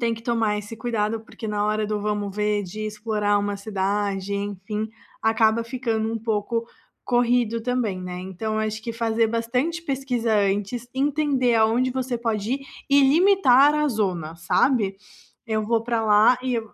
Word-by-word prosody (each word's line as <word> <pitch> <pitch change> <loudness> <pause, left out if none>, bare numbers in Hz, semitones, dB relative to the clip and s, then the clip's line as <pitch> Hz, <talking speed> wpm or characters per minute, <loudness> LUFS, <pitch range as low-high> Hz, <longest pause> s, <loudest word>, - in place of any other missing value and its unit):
tem 235 -1 +1
que 225 - -11
tomar 225 -3 +1
esse 210 +2 -8
cuidado, 225 -1 -1
porque 220 0 -9
na 210 -1 -1
hora 215 0 0
do 210 0 -2
vamos 205 -1 -2
ver, 210 0 0
de 190 +4 -8
explorar 210 -1 0
uma 205 0 -2
cidade, 200 -1 -2
enfim, 205 +2 -4 0.3
acaba 220 0 +3
ficando 230 -3 -2
um 225 - -2
pouco 225 +1 -1 0.4
corrido 240 -2 +2
também, 230 -5 -1
né. 180 0 -6
Então, 205 +4 -4
acho 220 0 -2
que 230 - -4
fazer 230 -1 +1
bastante 250 +9 -1
pesquisa 255 -6 -1
antes, 205 +4 0
entender 275 -3 +1
aonde 230 +3 +3
você 255 -2 -2
pode 225 0 -1
ir 275 - -5 0.3
e 280 - +6
limitar 295 -4 +5
a 300 0 +2
zona, 185 - -2
sabe, 200 +2 +1 0.5
"Eu 215 -1 0
vou 225 +1 +1
para 230 -1 -1
lá 215 +3 +5
e", 250 -3 0
220 Hz, 160 wpm, -24 LUFS, 210-245 Hz, 0.5 s, e